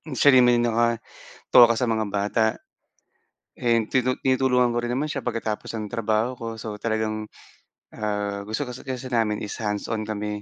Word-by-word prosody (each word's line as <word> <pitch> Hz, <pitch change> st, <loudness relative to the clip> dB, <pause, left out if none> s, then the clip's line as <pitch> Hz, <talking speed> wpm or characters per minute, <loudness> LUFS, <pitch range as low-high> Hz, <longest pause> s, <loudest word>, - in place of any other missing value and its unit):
siya 140 Hz, +1 st, +6 dB
rin 125 Hz, -, +7 dB
naman 120 Hz, 0 st, +5 dB
'yong 120 Hz, -, +2 dB
nakatoka 115 Hz, 0 st, -1 dB, 0.6 s
sa 125 Hz, -, 0 dB
mga 110 Hz, -1 st, +1 dB
bata 105 Hz, +2 st, 0 dB, 1.1 s
and 115 Hz, -2 st, +1 dB
tinut 130 Hz, 0 st, 0 dB
tinutulungan 130 Hz, -2 st, +3 dB
ko 120 Hz, -, -1 dB
rin 120 Hz, 0 st, -3 dB
naman 150 Hz, +4 st, -2 dB
siya 140 Hz, -3 st, -4 dB
pagkatapos 115 Hz, -2 st, -3 dB
ng 105 Hz, -2 st, -4 dB
trabaho 110 Hz, 0 st, 0 dB
ko. 115 Hz, -, -6 dB
So 110 Hz, -2 st, -6 dB
talagang, 110 Hz, -1 st, -2 dB, 0.7 s
ah, 105 Hz, -1 st, -2 dB
gusto 110 Hz, +8 st, -3 dB
kasi 125 Hz, -1 st, -8 dB
kasi 130 Hz, -1 st, -5 dB
namin 110 Hz, -3 st, +1 dB
is 105 Hz, -, -6 dB
hands-on 105 Hz, +1 st, -2 dB
kami. 105 Hz, -1 st, -3 dB
115 Hz, 165 wpm, -24 LUFS, 105-125 Hz, 1.1 s, rin